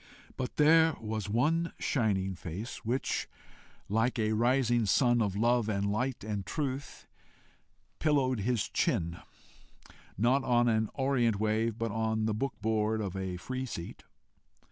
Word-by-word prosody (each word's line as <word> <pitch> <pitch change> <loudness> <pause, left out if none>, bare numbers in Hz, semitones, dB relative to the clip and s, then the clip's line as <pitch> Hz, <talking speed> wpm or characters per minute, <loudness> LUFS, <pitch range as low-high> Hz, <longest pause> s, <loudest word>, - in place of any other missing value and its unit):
But 130 - -4
there 160 +1 +5
was 110 -2 -4
one 160 +10 +1
shining 100 -7 0
face 90 +5 -6
which, 120 +4 -1 0.6
like 115 +5 +1
a 110 -1 +1
rising 120 0 +2
sun 120 +2 +3
of 100 -3 0
love 120 +1 +2
and 100 -1 0
light 125 +2 -2
and 105 -2 -3
truth, 140 - -4 0.9
"pillowed 135 -6 +2
his 115 +2 0
chin," 85 +1 -1 1.0
not 125 +7 +3
"on 120 -1 +3
an 110 -2 +2
orient 125 -6 +1
wave," 110 +1 0
but 115 -1 -2
on 110 0 0
the 110 - 0
book 130 +3 -2
board 110 0 +1
of 100 -3 -3
a 95 -2 -3
free 130 +8 -4
seat. 85 -7 -7
115 Hz, 140 wpm, -30 LUFS, 105-130 Hz, 1.0 s, there